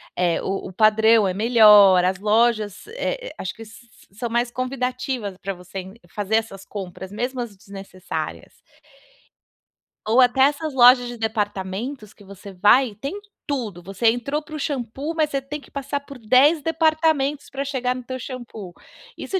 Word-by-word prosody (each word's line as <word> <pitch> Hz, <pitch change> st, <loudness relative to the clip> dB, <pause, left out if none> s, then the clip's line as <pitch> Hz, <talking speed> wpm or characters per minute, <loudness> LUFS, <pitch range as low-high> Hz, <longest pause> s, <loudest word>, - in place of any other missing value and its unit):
eh, 175 Hz, -2 st, +1 dB
o 195 Hz, 0 st, -4 dB
o -, -, -13 dB
padrão 220 Hz, +1 st, +4 dB
é 185 Hz, -, -1 dB
melhor, 210 Hz, -3 st, +6 dB
as 185 Hz, +1 st, 0 dB
lojas, 215 Hz, -, +1 dB
eh -, -, -4 dB
eh, -, -, -7 dB
acho 185 Hz, -, -5 dB
que -, -, -15 dB
s 220 Hz, +2 st, -15 dB, 0.3 s
são 235 Hz, +4 st, -5 dB
mais 240 Hz, +1 st, 0 dB
convidativas 250 Hz, -5 st, -3 dB
para 195 Hz, +1 st, -5 dB
você 185 Hz, +1 st, -9 dB, 0.2 s
fazer 205 Hz, +3 st, -2 dB
essas 220 Hz, -4 st, -2 dB
compras 190 Hz, -1 st, -8 dB
mesmo 245 Hz, +4 st, -3 dB
as 230 Hz, -4 st, -7 dB
desnecessárias. 195 Hz, -1 st, -8 dB, 1.4 s
Ou 225 Hz, +4 st, +3 dB
até 255 Hz, +1 st, +4 dB
essas 290 Hz, +2 st, +2 dB
lojas 245 Hz, -1 st, +6 dB
de 240 Hz, 0 st, -7 dB
departamentos 210 Hz, +1 st, -4 dB
que 205 Hz, -, -18 dB
você 200 Hz, +1 st, -11 dB
vai 210 Hz, +5 st, +4 dB
tem 275 Hz, -, -6 dB, 0.3 s
tudo, 230 Hz, -, -3 dB
você 195 Hz, +5 st, -1 dB
entrou 260 Hz, +6 st, -2 dB
para 310 Hz, 0 st, -10 dB
o -, -, -5 dB
xampu, 275 Hz, +2 st, -4 dB
mas 310 Hz, -2 st, +1 dB
você 275 Hz, -2 st, -2 dB
tem 285 Hz, +3 st, -6 dB
que -, -, -18 dB
passar 280 Hz, 0 st, -3 dB
por 280 Hz, -1 st, -12 dB
10 260 Hz, +7 st, +4 dB
departamentos 315 Hz, -3 st, +1 dB
pra 275 Hz, 0 st, -4 dB
chegar 255 Hz, -3 st, -1 dB
no 255 Hz, -, -7 dB
teu 255 Hz, +1 st, -6 dB
xampu. 235 Hz, -7 st, -8 dB, 0.4 s
Isso 380 Hz, -, -3 dB
235 Hz, 165 wpm, -22 LUFS, 205-275 Hz, 1.4 s, melhor